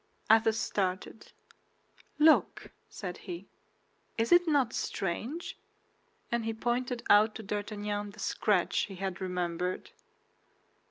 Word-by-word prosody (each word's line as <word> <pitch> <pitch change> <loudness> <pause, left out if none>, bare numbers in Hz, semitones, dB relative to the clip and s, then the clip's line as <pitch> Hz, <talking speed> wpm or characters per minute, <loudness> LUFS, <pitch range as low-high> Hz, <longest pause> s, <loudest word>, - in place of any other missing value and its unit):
Athos 225 0 +5
started. 190 0 -2 0.9
"Look," 310 +1 +4 0.2
said 180 -3 -6
he, 175 +2 -5 0.7
"is 225 0 0
it 350 0 +6
not 280 -7 +2
strange?" 230 - -3 0.7
and 235 -1 0
he 225 0 -2
pointed 245 +1 -1
out 210 +1 +5
to 220 - -7
D'Artagnan 205 0 -3
the 210 +2 -14
scratch 200 -5 +1
he 195 - -9
had 190 0 -4
remembered. 180 -1 -2
210 Hz, 110 wpm, -30 LUFS, 190-235 Hz, 0.9 s, it